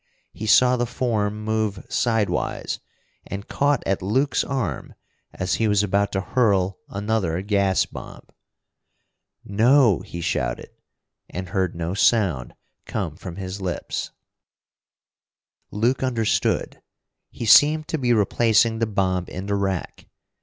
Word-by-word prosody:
He 110 - -6
saw 125 +3 +5
the 120 0 -1
form 110 -4 -1
move 110 -3 -2
sidewise, 110 -4 -1 0.5
and 100 +1 -6
caught 145 -2 +1
at 95 - 0
Luke's 130 +8 +1
arm 120 - -3 0.4
as 90 0 -2
he 110 - +1
was 105 -1 +3
about 100 0 +1
to 95 - 0
hurl 100 -5 +1
another 100 -4 -1
gas 100 -2 +2
bomb. - - -10 1.2
"No!" 115 +1 +4
he 85 - -8
shouted - - -2 0.6
and 90 0 -6
heard 95 -2 -1
no 85 +1 -3
sound 95 - +1 0.3
come - - -3
from 85 - -8
his 95 +1 -6
lips. 90 -3 -3 1.6
Luke 120 +5 0
understood. 120 -5 0 0.5
He 115 - -6
seemed 155 +7 +6
to 160 - -1
be 125 -2 +1
replacing 115 +1 +3
the 115 - +1
bomb 95 -3 0
in 95 +2 -6
the 100 - -2
rack. 95 -3 -3
105 Hz, 125 wpm, -23 LUFS, 95-115 Hz, 1.6 s, seemed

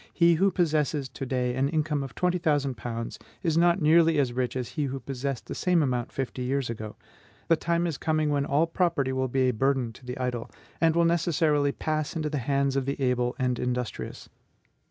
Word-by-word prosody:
He 170 -1 +4
who 190 +5 +3
possesses 155 -5 0
to 135 - -6
day 125 -1 0
an 135 +2 +1
income 155 -2 0
of 135 -2 -7
twenty 180 0 +1
thousand 145 -5 +1
pounds 115 +1 -5 0.2
is 165 -3 +1
not 175 +1 +3
nearly 165 +1 +5
as 130 -4 +1
rich 125 0 -1
as 125 -2 -3
he 150 -3 -2
who 135 0 -3
possessed 135 0 -4
the - - -6
same 180 -3 +2
amount 125 -3 -1
fifty 130 -1 -4
years 130 -1 -1
ago. 110 -2 -7 0.5
The 165 - +6
time 170 +2 0
is 165 -5 -3
coming 155 -1 +1
when 140 -1 +1
all 150 +4 +3
property 165 -5 0
will 130 0 0
be 130 +1 +1
a - - 0
burden 130 0 0
to - - -16
the 125 0 -6
idle, 125 -2 -3 0.3
and 165 -1 +4
will 170 0 +4
necessarily 160 -4 +2
pass 155 +1 -2
into 155 -2 -2
the 150 - -1
hands 140 +2 0
of 135 -1 0
the 140 - -2
able 125 -2 +1
and 125 -3 0
industrious. 125 -1 -3
140 Hz, 210 wpm, -27 LUFS, 125-160 Hz, 0.5 s, The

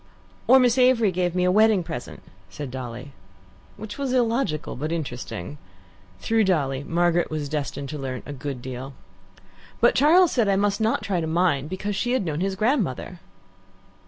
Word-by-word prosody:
"Or 260 - +8
Miss 250 -1 +3
Avery 250 -5 +4
giving 180 0 -1
me 180 - +2
a 180 - +3
wedding 215 -1 +4
present," 160 -7 -7 0.3
said 145 -4 -7
Dolly. 125 +1 -7 0.7
Which 210 +4 -8
was 270 -2 -1
illogical 230 - 0
but 155 +4 -4
interesting. 140 - -5 0.6
Through 225 - +1
Dolly, 140 -7 0
Margaret 175 +2 +1
was 155 -2 -3
destined 140 -1 -4
to 150 - -5
learn 130 -2 -5
a 145 - -6
good 135 -2 -6
deal. 130 +1 -7 0.9
"But - - +5
Charles 330 +5 +5
said 235 -5 +1
I 195 - +3
must 200 0 +1
try 220 +1 +3
not - - -2
to 175 -5 -1
mind, 160 -4 +1
because 195 +3 -3
she 245 +5 -1
had 255 -7 0
known 155 -2 -2
his 190 +1 -1
grandmother." 195 - -1
175 Hz, 170 wpm, -24 LUFS, 145-220 Hz, 0.9 s, Or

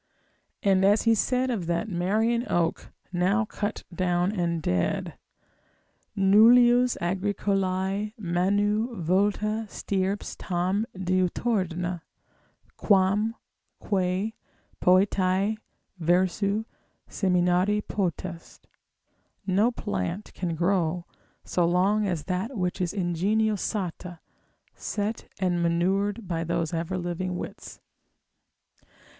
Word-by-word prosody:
And 190 -1 +3
as 205 +2 +4
he 230 - +4
said 250 +4 +1
of 190 -8 -3
that 170 +5 -1
Marian 220 +6 0
oak, 170 -1 0 0.2
now 190 +6 +2
cut 210 0 -4
down 180 +1 +1
and 170 -4 -1
dead, 90 - -1 1.0
nullius 240 +5 +6
Agricolae 195 +2 -1
manu 205 +5 0
vulta 205 +5 0
stirps 195 +1 -2
tam 185 +4 -1
diuturna, 185 -1 -1 0.8
quam 205 +3 +2 0.4
quae 190 +2 -1 0.5
poetae, 190 +2 +3 0.4
versu 190 +5 +1 0.4
seminari 180 +2 +1
potest, 180 -3 -4 0.8
no 200 +4 +3
plant 135 - -4
can 175 -3 -3
grow 175 0 0 0.4
so 180 - 0
long 190 +5 +2
as 170 -6 -2
that 195 - -3
which 180 0 -1
is 175 -2 0
ingenio 200 +4 +1
sata, 180 -3 -4 0.6
set 210 +1 -4
and 180 -2 0
manured 195 +5 0
by 165 -2 -2
those 170 -1 -2
ever 170 +3 -2
living 180 +1 -3
wits. - - -8
190 Hz, 95 wpm, -26 LUFS, 175-210 Hz, 1.0 s, nullius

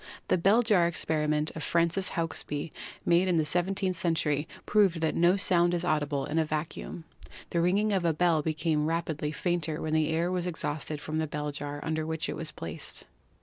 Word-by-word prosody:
The - - +4
bell 205 +7 +4
jar 200 -7 +4
experiment 150 -2 0
of 160 - -5
Francis 170 +4 +1
Hauksbee, 160 -2 -2 0.3
made 175 +2 +4
in 180 -2 +2
the 155 - +2
seventeenth 185 +3 +1
century, 155 -3 0 0.2
proved 200 -5 +3
that 160 - +1
no 175 +3 +4
sound 175 -3 +3
is 175 0 -1
audible 145 -4 0
in 160 +2 0
a - - +4
vacuum. 155 +2 -4 0.5
The 170 - +1
ringing 200 +5 +2
of 190 -2 +1
a 170 - +3
bell 160 0 +2
became 155 0 0
rapidly 160 -2 -2
fainter 165 -1 -1
when 155 0 -3
the 155 -1 +2
air 165 +2 0
was 180 -1 -1
exhausted 155 -3 -3
from 155 +2 -3
the 160 - -1
bell 150 0 -3
jar 145 0 -5
under 160 0 -1
which 160 +1 -3
it - - -3
was 165 -2 -1
placed. 80 - -5
165 Hz, 190 wpm, -29 LUFS, 155-175 Hz, 0.5 s, The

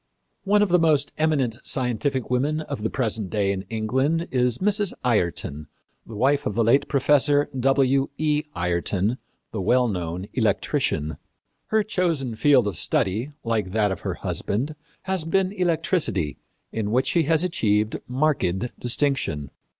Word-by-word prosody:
One 205 +1 +4
of 205 - 0
the 180 0 +4
most 155 -4 +2
eminent 140 -7 +1
scientific 130 0 -1
women 145 +5 +1
of 130 - -6
the 110 - -1
present 110 -6 -2
day 100 -1 0
in 95 0 -4
England 130 +10 0
is 125 -2 +1
Mrs. 205 0 +1
Ayrton, 85 - 0 0.4
the 110 - -9
wife 135 +6 +2
of 105 - -3
the 115 - +2
late 120 +6 +3
Professor 145 +1 +3
W. 135 +1 +3
E. 150 0 0
Ayrton, 90 +6 0 0.3
the 105 - -3
well 125 +6 +3
known 90 -3 -3
electrician. 75 0 0 0.5
Her 220 -1 +2
chosen 165 - -1
field 130 +1 +4
of 105 - 0
research, 105 - 0
like 110 -5 -1
that 105 -2 +2
of 95 - -3
her - - -4
husband, 130 +10 -2 0.3
has 190 -3 -1
been 185 +3 +1
electricity, 165 - 0 0.3
in 110 -2 -2
which 125 +4 +2
she 170 - +2
has 165 0 +4
achieved 110 - +1
marked 125 - 0
distinction. 120 - 0
125 Hz, 150 wpm, -24 LUFS, 105-155 Hz, 0.5 s, One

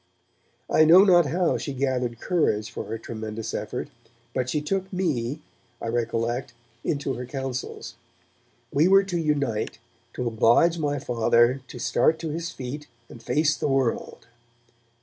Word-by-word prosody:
I 155 - +5
know 170 +5 +8
not 175 -5 +5
how 175 +4 +1
she 140 - -4
gathered 125 -3 -1
courage 120 - 0
for - - -5
her 115 - -4
tremendous 110 0 -6
effort, 105 - -4 0.4
but 130 0 -1
she 150 - 0
took 190 +5 -2
me, 150 -7 -1 0.4
I 115 - -4
recollect, 115 +2 -1 0.3
into 140 -3 -1
her 125 0 -6
counsels. 130 -1 -5 0.8
We 150 +5 +4
were 195 +1 +6
to 180 -3 -2
unite 140 -11 -1 0.4
to 125 - -3
oblige 120 +9 +4
my 145 -2 0
Father 120 0 +2
to - - -9
start 155 +6 +2
to 165 - -3
his 165 +2 -3
feet 140 +4 -7 0.2
and 115 - -12
face 150 +5 +2
the - - -2
world. 135 -4 -1
135 Hz, 150 wpm, -25 LUFS, 120-160 Hz, 0.8 s, know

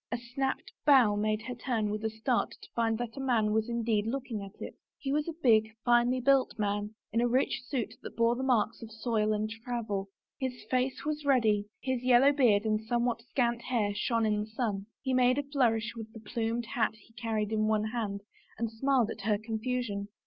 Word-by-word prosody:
A 240 - 0
snapped 245 +3 -3
bough 255 -8 +6
made 215 +1 0
her 250 - -4
turn 230 -3 -1
with 215 +1 -3
a 220 - +1
start 220 +3 -1
to - - -12
find 225 -1 +1
that 240 +1 -5
a - - -4
man 235 -5 +2
was 220 +2 +1
indeed 225 -3 0
looking 245 -3 -3
at 195 0 -10
it. - - -6 0.2
He 270 - -3
was 300 +2 0
a 335 - -3
big, 220 -3 +4
finely 240 +1 +4
built 270 -1 +3
man, 205 0 -1 0.2
in 230 - +2
a 240 - +3
rich 255 +3 +1
suit 235 -6 -2
that - - -9
bore 230 +1 +3
the 255 - -4
marks 245 -5 +1
of 230 - -8
soil 220 -1 0
and 215 0 0
travel. 220 -3 -4 0.3
His 260 -2 -4
face 255 +2 0
was 300 0 -2
ruddy; 220 -7 +3
his 260 -2 -1
yellow 255 +2 +6
beard 225 -7 +4
and 215 0 +1
somewhat 240 +1 0
scant 235 -2 +1
hair 220 -5 0
shone 225 +2 0
in 210 -1 +1
the 210 - -3
sun. 215 -3 -2 0.2
He 260 -1 0
made 255 0 +4
a 290 - 0
flourish 240 -6 +1
with 225 -1 -8
the 225 - -9
plumed 230 +1 -2
hat 235 -4 +1
he 220 +1 -21
carried 220 -2 -2
in 215 0 +1
one 215 -1 +2
hand 210 -4 -3 0.4
and 230 0 -2
smiled 245 -1 +2
at 220 - -7
her 210 +1 +1
confusion. 220 -1 -3
230 Hz, 210 wpm, -30 LUFS, 215-250 Hz, 0.4 s, bough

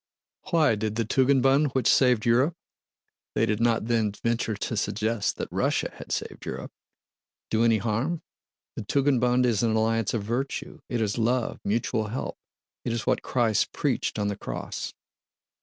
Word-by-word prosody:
"Why? 160 -8 +4
Did 110 0 -2
the 115 -1 0
Tugendbund 135 +3 +3
which 125 -3 +2
saved 125 -4 +4
Europe" 130 +8 +3 0.8
(they - - +3
did 105 +1 0
not 115 -2 +2
then 115 -3 +1
venture 115 -2 0
to 110 +3 -3
suggest 110 +1 -1
that - - -3
Russia - - 0
had - - -10
saved - - -3
Europe) - - -6 0.8
"do 110 +1 +3
any 115 -1 +4
harm? 120 - -1 0.5
The - - -4
Tugendbund 125 0 +2
is 115 -4 +2
an 115 -2 +2
alliance 115 0 +1
of 110 - -1
virtue: 120 +6 -3
it 120 -2 -1
is 105 +1 -1
love, 120 +1 0
mutual 110 0 0
help... 120 +5 -4 0.4
it 120 - -2
is 115 - -3
what - - +1
Christ 115 -4 +1
preached - - -1
on 105 -1 0
the 100 - -1
Cross." - - -5
115 Hz, 160 wpm, -26 LUFS, 110-125 Hz, 0.8 s, Why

